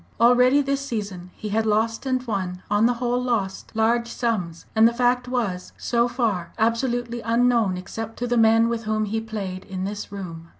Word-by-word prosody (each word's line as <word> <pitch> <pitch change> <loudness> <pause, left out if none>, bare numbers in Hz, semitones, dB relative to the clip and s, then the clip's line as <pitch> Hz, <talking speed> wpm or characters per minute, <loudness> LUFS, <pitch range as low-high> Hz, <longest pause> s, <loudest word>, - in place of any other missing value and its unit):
Already 250 +4 +5
this 275 0 -1
season 200 -8 -5
he 215 - -6
had 220 +2 0
lost 225 +4 0
and 255 -1 0
won 185 -5 -3
on 210 +2 +4
the 245 - +1
whole 245 +1 0
lost 220 -6 -2
large 235 +2 +2
sums. 210 -9 -2
And 220 +1 +7
the 235 - 0
fact 250 0 +2
was 220 -8 -2
so 235 0 +1
far 220 -9 -1
absolutely 235 +1 0
unknown 230 -4 +2
except 225 +4 -6
to 245 - -2
the 245 0 0
men 225 0 +5
with 235 -1 -2
whom 215 0 0
he 220 +2 -2
played 200 -5 -5
in 190 -2 -5
this 205 +1 -5
room. 170 -4 -7
225 Hz, 185 wpm, -24 LUFS, 200-240 Hz, -, And